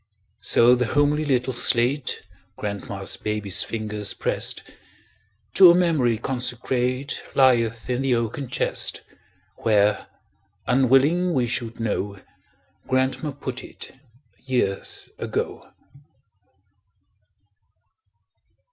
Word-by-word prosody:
So 120 +1 +6
the 125 -1 +1
homely 145 +3 +1
little 130 -3 0
slate 120 +3 +2 0.3
Grandma's 100 -1 -3
baby's 105 -1 0
fingers 105 -2 -2
pressed, - - -1 0.9
To 185 -2 +8
a 170 - +6
memory 155 -10 +2
consecrate, 125 +2 -2
Lieth 115 -4 +2
in 125 0 -1
the 135 -2 +1
oaken 115 +4 -3
chest, - - 0 0.6
Where, 105 -2 +1 0.6
unwilling 135 +8 +3
we 125 -2 +2
should 115 -1 -3
know, 100 -3 -3 0.7
Grandma 130 +3 0
put 130 -2 -6
it, - - -10 0.5
years 125 -7 -2
ago. - - -4
125 Hz, 90 wpm, -23 LUFS, 115-135 Hz, 0.9 s, To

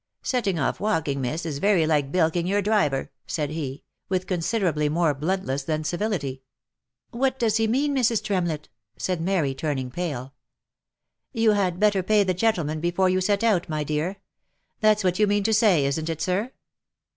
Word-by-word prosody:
" - - -52
Setting 205 -8 0
off 140 - -1
walking, 160 -10 0
miss, 155 +7 -3
is 145 -4 -3
very 195 -2 +3
like 145 -3 +1
bilking 170 0 +1
your 200 +2 +1
driver," 190 -11 +1 0.2
said 150 -3 -2
he, 145 -4 -5 0.3
with 185 -1 0
considerably 175 -4 0
more 160 0 +2
bluntness 150 -2 -2
than 155 +2 -2
civility. 160 -6 -2 0.7
u 235 - -7
What 265 0 +1
does 225 -3 +2
he 225 0 +2
mean, 280 +5 +1
Mrs. 235 -4 +2
Tremlett 175 -6 -1 0.3
V* - - -32
said 180 -3 -1
Mary, 165 -6 +1
turning 135 -3 -3
pale. 135 -5 -4 0.5
" - - -59
You 225 -1 +5
had 185 -4 0
better 205 -2 +3
pay 210 +2 +3
the 185 -1 0
gentleman 170 -6 0
before 175 +3 +1
you 185 0 +1
set 200 +3 +1
out, 200 -7 +2
my 155 -1 -1
dear. 155 +6 -2 0.6
That's 215 -1 +3
what 180 +1 +1
you 210 - +4
mean 205 0 +1
to 220 +2 +1
say, 205 - +4
isn't 155 +4 -1
it, 165 -1 -3
sir 200 +7 -1
180 Hz, 185 wpm, -25 LUFS, 150-205 Hz, 0.7 s, You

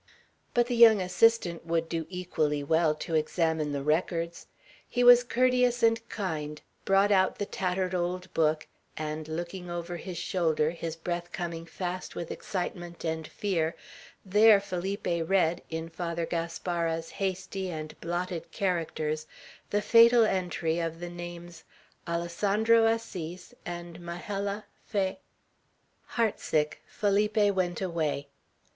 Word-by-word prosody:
But 240 0 +4
the 245 0 -2
young 230 -3 +8
assistant 185 -2 +2
would 165 0 0
do 165 -1 -3
equally 155 -5 -1
well, 160 +1 +3
to 165 - -6
examine 160 -1 +1
the 140 -1 -2
records. 170 +2 -1 0.4
He 245 - +1
was 245 0 +9
courteous 250 0 +2
and 225 0 +4
kind; 150 -7 -3 0.3
brought 195 +1 +4
out 190 -2 +3
the 205 - -2
tattered 185 -1 -1
old 180 +1 -2
book, 155 -1 +2 0.3
and, 155 0 -4
looking 175 +3 -5
over 175 0 -4
his 180 0 -7
shoulder, 160 -4 +1
his 165 -1 -5
breath 175 +1 -4
coming 170 -2 -4
fast 180 +1 -5
with 170 - -5
excitement 175 -2 -5
and 160 -1 -2
fear, 170 -5 -1 0.5
there 210 +2 +6
Felipe 195 +1 -4
read, 170 0 +1
in 160 0 -4
Father 170 0 -3
Gaspara's 165 0 -2
hasty 190 0 -3
and 155 -2 -5
blotted 175 0 -3
characters, 155 -4 -1 0.4
the 205 0 0
fatal 230 +1 +7
entry 175 -4 0
of 165 -1 -3
the 175 0 -6
names, 175 -1 -8 0.4
"Alessandro 205 +7 +2
Assis 185 -4 -3
and 175 -1 -6
Majella 200 +4 -4 0.2
Fa 190 -3 -1 0.5
" - - -42
Heart 230 -3 +2
sick, 150 -1 0
Felipe 205 0 +2
went 180 -2 -1
away. 160 -6 -1
175 Hz, 130 wpm, -29 LUFS, 165-195 Hz, 0.5 s, was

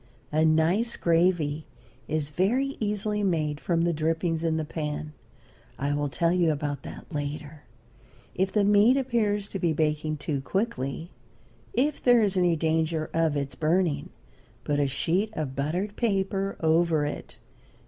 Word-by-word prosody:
A 155 +1 +2
nice 165 +9 +2
gravy 165 -3 +1 0.4
is 150 -1 -2
very 245 - +1
easily 210 0 -1
made 155 -6 0
from 165 0 0
the 170 0 +2
drippings 165 +1 -1
in 160 -1 +1
the 155 - -2
pan. 150 -1 -4 0.6
I 140 +1 -1
will 145 0 -1
tell 170 +6 +1
you 175 -3 +3
about 145 -1 -3
that - - -9
later. 150 +1 -5 0.7
If 190 +1 0
the 210 - +2
meat 210 +5 +5
appears 215 -6 0
to 195 - -4
be 170 -2 +1
baking 155 0 0
too 145 -1 -3
quickly, 165 - -2 0.6
if 295 -2 +1
there 245 -2 +5
is 200 -2 +1
any 175 -2 +3
danger 160 0 0
of 160 -3 +1
its 140 -1 -3
burning, 165 0 0 0.5
put 145 -1 0
a 145 - +2
sheet 175 +10 0
of 145 -7 -4
buttered 175 +9 -2
paper 195 -3 -1
over 160 -1 +3
it. 145 - -6
165 Hz, 150 wpm, -27 LUFS, 150-195 Hz, 0.7 s, meat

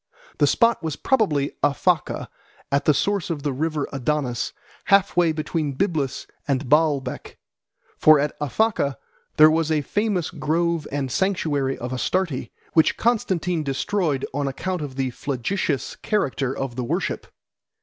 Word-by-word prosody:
The - - +5
spot 230 -3 +3
was 160 -3 -3
probably 155 - +1
Aphaca, 165 +4 +1 0.4
at 140 +1 +1
the 150 - +5
source 200 0 0
of 155 -4 -3
the 145 -2 -1
river 155 +1 -1
Adonis, 135 -2 -1 0.3
half 200 -1 +4
way 175 -2 +4
between 155 -1 -2
Byblus 145 -4 -1 0.2
and 135 -1 0
Baalbec; 145 -3 +1 0.6
for 155 -1 +7
at 145 +1 -1
Aphaca 150 - +1 0.4
there 155 +1 +8
was 160 0 +1
a 155 -1 +2
famous 205 +1 -1
grove 165 +1 0
and 135 -2 -2
sanctuary 145 -6 0
of 125 +1 -5
Astarte 160 +2 -1 0.2
which 160 - +4
Constantine 185 -7 +1
destroyed 145 +1 -1
on 140 0 -1
account 180 +6 -3
of 140 -3 -6
the 130 -1 -1
flagitious 140 +4 -2
character 140 - -1
of 135 -3 -3
the 125 - -2
worship. 120 - -2
150 Hz, 140 wpm, -23 LUFS, 140-175 Hz, 0.6 s, there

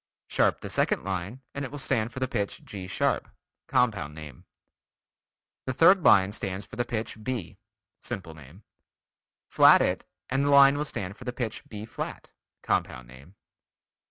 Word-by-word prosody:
Sharp - - +1
the - - -6
second - - +1
line 95 +7 -4
and 140 - -4
it 135 - -4
will 145 - -7
stand 120 -5 -1
for 130 - -7
the 130 - 0
pitch 100 -5 -3
G 95 -3 -7
sharp. 95 - 0 0.4
(Compound 100 -12 +1
name.) 75 -5 -11 1.2
The 130 - -1
third 185 +4 +6
line 95 -1 +6
stands 100 -2 -4
for 100 - -12
the 120 +1 -1
pitch 110 -2 -4
B. 105 -7 -4 0.4
(Simple 90 -5 -6
name.) 75 +6 -15 0.8
Flat - - +6
it, - - -1 0.2
and 135 +1 0
the - - +2
line 140 0 +7
will 150 +1 -1
stand 100 -7 -5
for - - -11
the 125 - -2
pitch 120 -3 -5
B 105 0 -7
flat. - - -7 0.3
(Compound 65 -2 -1
name.) 70 +9 -15
105 Hz, 165 wpm, -27 LUFS, 95-130 Hz, 1.2 s, line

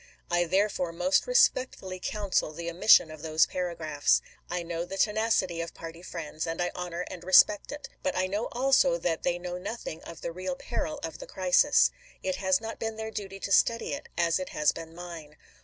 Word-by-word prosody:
I 175 0 +3
therefore 185 -1 +1
most 275 - +1
respectfully 255 - +2
counsel 200 -5 -1
the 170 +2 -5
omis 170 +5 -5
sion 160 - +8
of 155 -1 -10
those 160 0 +3
paragraphs. 165 -5 0 0.3
I 175 0 -2
know 170 0 -3
the 190 +2 -6
tenacity 210 -5 +1
of 165 - -6
party 165 0 -9
friends, 165 -3 -5
and 165 +1 -3
I 175 0 0
honor 180 -1 -4
and 180 -2 -8
respect 190 +3 +5
it. 290 -1 -7
But 280 - -1
I 185 - +2
know 205 +4 -2
also 270 - +3
that 165 - -1
they 175 0 0
know 180 0 -5
nothing 190 -4 -6
of 170 - -10
the 170 - -3
real 185 +1 -4
peril 300 +10 -4
of 325 -1 -5
the - - -9
crisis. - - +4 0.3
It 280 -1 -1
has 190 -1 +2
not 225 0 -7
been 225 -1 -3
their 220 0 -5
duty 195 -2 -6
to 200 - -4
study 230 +4 +3
it, 285 - -6
as 170 0 +2
it 185 - -5
has 150 0 +2
been 165 0 -9
mine. 170 -4 -9
180 Hz, 205 wpm, -28 LUFS, 170-220 Hz, 0.3 s, sion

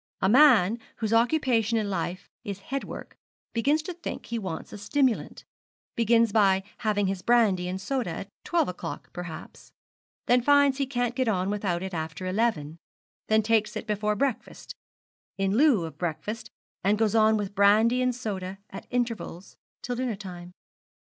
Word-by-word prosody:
A - - +2
man, 235 -4 +6 0.2
whose 220 -1 -2
occupation 230 -2 +2
in 215 -2 0
life 180 -1 -3 0.2
is 200 -2 -5
headwork, 275 0 -5 0.3
begins 285 +7 +1
to 360 - -5
think 345 0 -7
he 235 0 -3
wants 185 -6 -6
a 210 - -7
stimulant 255 +4 0 0.5
begins 230 -1 +3
by 195 -3 +3 0.2
having 205 -2 +1
his 190 -1 -2
brandy 210 -7 +3
and 185 +1 -3
soda 255 0 -2
at 195 +4 -6
twelve 345 -1 +1
o'clock 180 - -7
perhaps; 175 -2 -9 0.5
then 245 +1 +4
finds 285 +1 +4
he 275 - 0
can't 245 -2 -1
get 255 0 -1
on 190 -2 0
without 190 -4 -1
it 190 0 -5
after 160 +2 -4
eleven; 185 -6 -1 0.5
then 220 0 +3
takes 220 -1 +1
it - - -4
before 210 -1 0
breakfast 250 +1 -3 0.6
in 195 0 0
lieu 250 - +4
of 160 - -10
breakfast; 175 +6 -4 0.3
and 205 +2 +3
goes 220 -1 +1
on 220 -1 +4
with 205 -2 -4
brandy 215 +5 +4
and 250 -1 +1
soda 195 -6 -5
at - - -9
intervals 230 -7 -3 0.3
till 245 - -3
dinner 245 -2 -2
time. 180 -3 -9
215 Hz, 160 wpm, -27 LUFS, 190-245 Hz, 0.6 s, man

